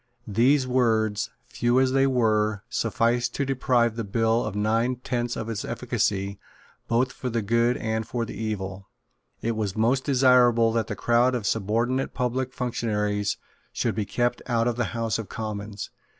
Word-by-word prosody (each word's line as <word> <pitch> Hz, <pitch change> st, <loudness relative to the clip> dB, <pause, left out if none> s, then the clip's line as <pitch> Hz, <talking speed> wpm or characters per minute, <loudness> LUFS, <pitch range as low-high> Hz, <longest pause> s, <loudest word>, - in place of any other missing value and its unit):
These 125 Hz, +6 st, +3 dB
words, 110 Hz, -5 st, +1 dB, 0.2 s
few 120 Hz, +1 st, +1 dB
as 130 Hz, -1 st, +3 dB
they 135 Hz, +1 st, +3 dB
were, 110 Hz, -5 st, +1 dB
sufficed 120 Hz, +1 st, 0 dB
to 140 Hz, -, 0 dB
deprive 125 Hz, -3 st, +1 dB
the 115 Hz, -, -3 dB
bill 115 Hz, +3 st, +1 dB
of -, -, -4 dB
nine 115 Hz, +4 st, +1 dB
tenths 120 Hz, -1 st, -2 dB
of 110 Hz, -, -4 dB
its 115 Hz, -3 st, -3 dB
efficacy, 100 Hz, 0 st, -1 dB, 0.5 s
both 120 Hz, +2 st, +1 dB
for 130 Hz, -, -5 dB
good 115 Hz, +2 st, +1 dB
and 110 Hz, 0 st, -2 dB
for 120 Hz, -1 st, -2 dB
evil. 100 Hz, -3 st, -5 dB, 0.5 s
It 115 Hz, 0 st, 0 dB
was 105 Hz, -3 st, -2 dB
most 125 Hz, +4 st, +2 dB
desirable 125 Hz, -4 st, +4 dB
that 115 Hz, 0 st, 0 dB
the 105 Hz, -, -4 dB
crowd 120 Hz, +5 st, +2 dB
of 115 Hz, -5 st, -3 dB
subordinate 115 Hz, +6 st, 0 dB
public 125 Hz, +1 st, -1 dB
functionaries 105 Hz, -5 st, -1 dB, 0.4 s
should -, -, 0 dB
be 110 Hz, -2 st, -2 dB
kept 120 Hz, +4 st, -1 dB
out 115 Hz, -1 st, +1 dB
of 120 Hz, -, 0 dB
the 120 Hz, -1 st, 0 dB
House 115 Hz, -2 st, 0 dB
of 110 Hz, -, -6 dB
Commons. 105 Hz, -2 st, -5 dB
115 Hz, 160 wpm, -25 LUFS, 110-125 Hz, 0.5 s, desirable